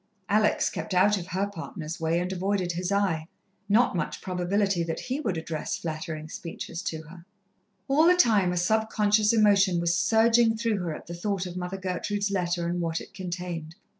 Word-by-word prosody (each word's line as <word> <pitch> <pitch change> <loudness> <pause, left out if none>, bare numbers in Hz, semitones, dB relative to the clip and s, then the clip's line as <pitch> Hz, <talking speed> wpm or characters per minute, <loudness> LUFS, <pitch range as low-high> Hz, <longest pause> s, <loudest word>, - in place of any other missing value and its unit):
Alex 210 +1 +2
kept 185 - -4
out 200 +3 +5
of 180 -3 -5
her 190 +3 -1
partner's 165 -3 -7
way, 165 +1 +1
and 180 +2 -2
avoided 190 -1 -1
his 175 +2 -3
eye. 185 -6 +1 0.4
Not 225 0 +4
much 170 - -2
probability 185 +1 0
that 165 -1 -2
he 260 +3 -3
would 205 - -2
address 160 -1 -3
flattering 155 -1 -5
speeches 165 +1 -6
to 160 -1 -4
her! 170 +2 -13 0.6
All 295 +4 +4
the 360 - +6
time 210 - +4
a 180 - -2
subconscious 210 +2 +2
emotion 200 -5 +4
was 170 0 +1
surging 225 +4 +4
through 225 -2 0
her 170 -4 -3
at - - -10
the 170 - -7
thought 190 +2 -2
of 180 -1 -7
Mother 180 +1 -4
Gertrude's 200 +2 -2
letter 175 -2 -1
and 175 +1 -1
what 165 -1 -1
it - - -12
contained. 175 -3 -5
185 Hz, 185 wpm, -27 LUFS, 170-205 Hz, 0.6 s, the